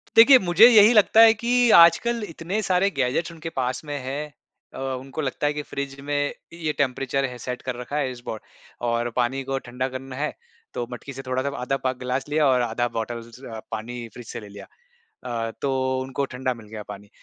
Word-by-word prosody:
देखिए 245 +4 +9
मुझे 185 +3 +7
यही 220 -1 +7
लगता 220 0 +5
है 225 -1 +9
कि 240 +2 +2
आज 170 0 +8
कल 235 -1 -2
इतने 170 +6 -3
सारे 185 +1 +2
गैजेट्स 140 +6 0
उनके 165 0 -7
पास 130 -4 -2
में 145 -1 -4
हैं 145 +3 -5 0.4
अ, - - -9
उनको 135 +2 -4
लगता 140 +1 -1
है 150 - 0
कि 150 - -3
फ्रिज 140 -1 -6
में 145 0 0 0.2
ये 165 -2 -2
टेंपरेचर 135 0 0
है 125 -2 -6
सेट 125 +1 -5
कर 130 -1 -4
रखा 135 +4 -4
है 135 -3 0
इस 125 - -9
बो 110 - -4 0.5
और 120 0 0
पानी 130 +2 0
को 135 +1 -2
ठंडा 125 +1 -4
करना 130 0 -7
है, 150 +3 -2 0.4
तो 120 - -3
मटकी 130 +3 -8
से 135 - -7
थोड़ा 130 0 -1
जब 140 0 -3
आधा 135 +1 -1
प 130 - +2
ग्लास 125 +1 -2
लिया 150 0 +2
और 130 -2 +3
आधा 120 0 0
बॉटल 115 +1 -3
ज़ 115 +3 -14 0.3
पानी 115 +2 -5
फ्रिज 120 - -10
से - - -6
ले 105 - -11
लिया। 100 0 -11 0.8
अ, - - -5
तो 130 -1 0
उनको 135 +1 -2
ठंडा 130 -1 -3
मिल 115 -3 -14
गया 105 0 -8
पानी, 100 0 -9
135 Hz, 215 wpm, -24 LUFS, 125-155 Hz, 0.8 s, देखिए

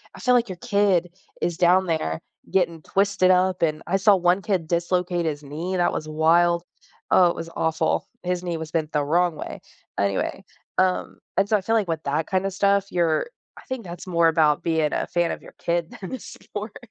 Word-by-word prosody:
I - - -11
feel 250 - +2
like 235 -4 +3
your 185 - -4
kid 195 -5 +1 0.3
is 175 - -1
down 180 +1 +4
there 155 - -1 0.3
getting 170 -4 +1
twisted 195 0 +2
up, 185 0 +3
and 155 -2 0
I 185 +3 +1
saw 200 +1 +5
one 180 +1 +2
kid 190 -5 -1
dislocate 175 +1 0
his 150 -1 -3
knee, 160 +6 -5
and 180 - +1
that - - +2
was 155 - -4
wild. 170 +2 +3 0.5
Oh, 180 - +6
it - - -2
was 165 - -6
awful. 160 0 0 0.2
His 180 0 -2
knee 175 -2 -2
was 160 -1 -7
bent 160 -2 -1
the 150 - +1
wrong 175 +2 +2
way. - - -7 0.4
Anyway, 100 -1 -1 0.4
um, 185 -1 0 0.2
and 195 - +3
so 215 - +2
I 200 - -4
feel 225 +4 0
like 210 -5 +1
with 160 -2 -2
that 150 +3 -1
kinda 190 +1 +1
stuff, 200 0 +1
you're 170 - +1 0.3
I - - -12
think 260 -3 -5
that's 175 +1 -9
more 170 -2 +3
about 155 -2 +3
being 160 -2 +1
a - - 0
fan 175 -1 0
of - - -5
your - - -12
kid 170 -1 -1
than 190 +5 -7
a 260 - -4
sport. 210 0 -8
175 Hz, 215 wpm, -24 LUFS, 160-190 Hz, 0.5 s, Oh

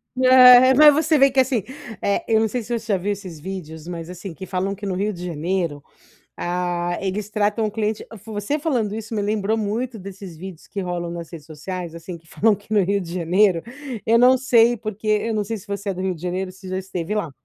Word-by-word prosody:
É, 255 0 +8
mas 300 +1 +8
você 310 +1 +2
vê 275 -1 +5
que, 270 - +2
assim. 255 -5 +2 0.4
Eh, 200 - 0
eu 220 -1 +3
não 220 - +2
sei 245 +3 -3
se 220 - -11
você 220 -2 -2
já - - +3
viu 195 +3 -2
esses 190 -5 -7
vídeos, 160 -2 -7
mas, 170 -1 -6
assim, 180 0 -8
que 190 +3 -8
falam 190 +1 -2
que 205 - -8
no 195 - -2
Rio 205 +3 0
de 180 -2 -7
Janeiro, 170 -2 -2 0.6
ah, 175 0 -2
eles 195 +2 -3
tratam 210 +1 0
o 215 - 0
cliente 215 0 -2 0.2
você 215 +7 -2
falando 245 -9 -1
isso 220 +1 -6
me 210 - -1
lembrou 210 +1 0
muito 225 +3 -2
desses 195 -2 -9
vídeos 180 0 -10
que 200 - -5
rolam 175 -1 -3
nas 170 -1 -7
redes 155 -4 -10
sociais, 165 +2 -6
assim, 170 +1 -8
que 165 - -27
falam 215 +6 +2
que 205 +2 -16
no 205 - +5
Rio 200 +2 +1
de 175 -3 -7
Janeiro, 180 0 +2 0.4
eu 230 +1 +4
não 250 +2 +6
sei 240 -2 +4
porque 215 -1 -7
eu 215 +2 +1
não 210 -1 -1
sei 225 +3 -3
se 205 0 -12
você 200 0 -4
é 195 - -1
do 185 - -5
Rio 190 -1 -1
de 160 - -13
Janeiro 180 +2 -3
ou - - -10
se 190 0 -12
já 185 - -3
esteve 185 0 -4
lá. 205 -7 -2
200 Hz, 240 wpm, -22 LUFS, 180-220 Hz, 0.6 s, É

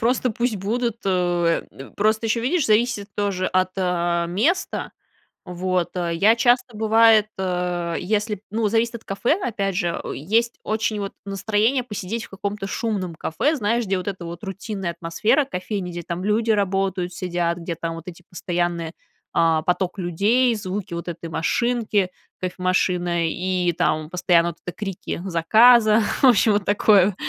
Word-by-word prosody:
просто 245 +1 +1
пусть 235 0 -1
будут. 230 +4 -1
Э, 175 -2 +1
д 135 - -11
просто 215 +2 +1
ещё, 225 +1 +1
видишь, 280 +6 +1
зависит 215 -1 +2
тоже 195 -3 -1
от, 185 0 +1
а, 175 -2 0
места, 225 - -1 0.5
вот. 180 0 -1
А, 175 -1 -1
я 205 +7 +4
часто 245 -1 +2
бывает, 220 0 +5
э, 180 -2 -2
если, 210 +1 -1
ну, 220 0 +1
зависит 230 +2 +1
от 230 - -9
кафе, 235 - 0
опять 200 -5 -2
же, 175 -2 -1
есть 225 - 0
очень, 215 -1 -1
вот, 200 -1 -4
настроение 215 +6 +1
посидеть 220 0 -5
в - - -17
каком-то 200 +1 -4
шумном 195 -6 -3
кафе, 275 - 0
знаешь, 230 0 0
где 195 -1 0
вот 185 - -6
эта 185 -3 -4
вот 170 0 -8
рутинная 195 -1 -4
атмосфера 170 - +1
кофейни, 185 -4 -4
где 175 0 -5
там 170 +2 -4
люди 220 +2 +1
работают, 195 -3 0
сидят, 175 -1 -1
где 170 0 -5
там 165 0 -4
вот 165 +2 -10
эти 180 0 -10
постоянные, 175 -2 -2 0.4
а, 165 -1 +3
поток 180 +3 -1
людей, 205 +8 +2
звуки 195 -2 -5
вот 170 +1 -5
этой 170 0 -6
машинки, 210 +4 0 0.3
кофемашины, 180 -2 0
и 180 -1 0
там 155 -1 0
постоянно 175 -2 +3
вот 170 - -9
эти 180 - -5
крики 195 -4 -5
заказа. 215 +6 +5 0.2
В - - +6
общем, 230 -3 +5
вот 205 -1 0
такое, 205 -2 +4
195 Hz, 160 wpm, -22 LUFS, 175-220 Hz, 0.5 s, В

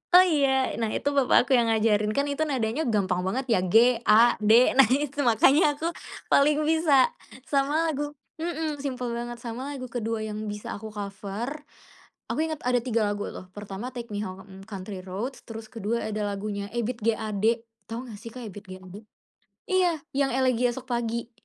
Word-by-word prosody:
Oh, 365 - +10
iya. 290 -6 +2 0.3
Nah, 225 - 0
itu 285 - 0
papa 275 -4 +4
aku 270 - -8
yang 235 - +3
ngajarin. 215 -1 +2
Kan 285 +1 +1
itu 310 +2 -1
nadanya 260 +1 -1
gampang 190 -5 +1
banget, 260 +7 -1
ya, 225 - +4
G-A-D, 225 +1 +4 0.3
nah, 270 - +9
itu 285 +3 0
makanya 285 - +5
aku 330 +4 -2 0.4
paling 295 +2 +4
bisa. 310 -4 +4 0.3
Sama 290 +4 +1
lagu, 290 0 -4 0.2
hmm, 320 -3 -3
simpel 255 -3 -3
banget, 240 +1 -4
sama 255 +5 -5
lagu 255 -2 -7
kedua 225 -2 -2
yang 215 0 -5
bisa 210 0 -5
aku 220 +1 -7
cover 205 +8 -5 0.6
Aku - - -2
inget 315 -2 -3
ada 250 0 +2
tiga 230 -4 +1
lagu, 205 0 -3
loh. 185 - -9
Pertama, 205 +3 -6
Take 235 -2 -7
Me 205 - -2
Home, 190 -1 -8
Country 195 -1 -6
Roads, 200 +8 -5
terus 225 -1 -7
kedua 230 0 -2
ada 210 -1 -2
lagunya 200 0 -4
Ebiet 235 0 -2
G. 225 +1 +2
Ade, 220 +2 0 0.2
tahu 235 +3 -5
enggak, 215 -4 -9
sih, 230 - -8
Kak 245 +1 -9
Ebiet 205 -1 -10
G. - - -6
Ade? 185 +3 -10 0.7
Iya, 360 -3 +3 0.2
yang 270 -2 +1
Elegi 255 -2 +2
Esok 245 +1 -4
Pagi. 235 0 -2
235 Hz, 180 wpm, -26 LUFS, 210-275 Hz, 0.7 s, Oh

